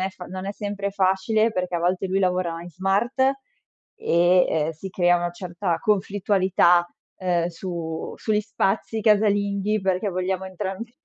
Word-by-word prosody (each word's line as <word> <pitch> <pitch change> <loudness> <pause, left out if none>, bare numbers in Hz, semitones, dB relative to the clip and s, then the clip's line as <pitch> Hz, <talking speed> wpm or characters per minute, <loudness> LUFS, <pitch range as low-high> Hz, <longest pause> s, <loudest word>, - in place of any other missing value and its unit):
non 190 - -1
fa 180 -1 -11
non 185 +1 -6
è 200 - -3
sempre 200 -1 -4
facile 200 +3 +2
perché 180 -3 -2
a - - -2
volte 180 +2 0
lui 190 +1 +1
lavora 180 -3 0
in 175 - -10
smart 195 - -1 0.8
e 180 - +3
ehm 155 0 0
si 175 +5 -8
crea 175 -1 +3
una 175 0 -2
certa 175 -1 -3
conflittualità 190 -3 +2 0.3
ehm 175 -2 +1
su 165 -2 -5
sugli 215 -1 0
spazi 215 +1 -1
casalinghi, 205 -1 +2
perché 190 +1 0
vogliamo 185 +1 -2
entrambi, 195 +5 -6
190 Hz, 150 wpm, -24 LUFS, 175-200 Hz, 0.8 s, e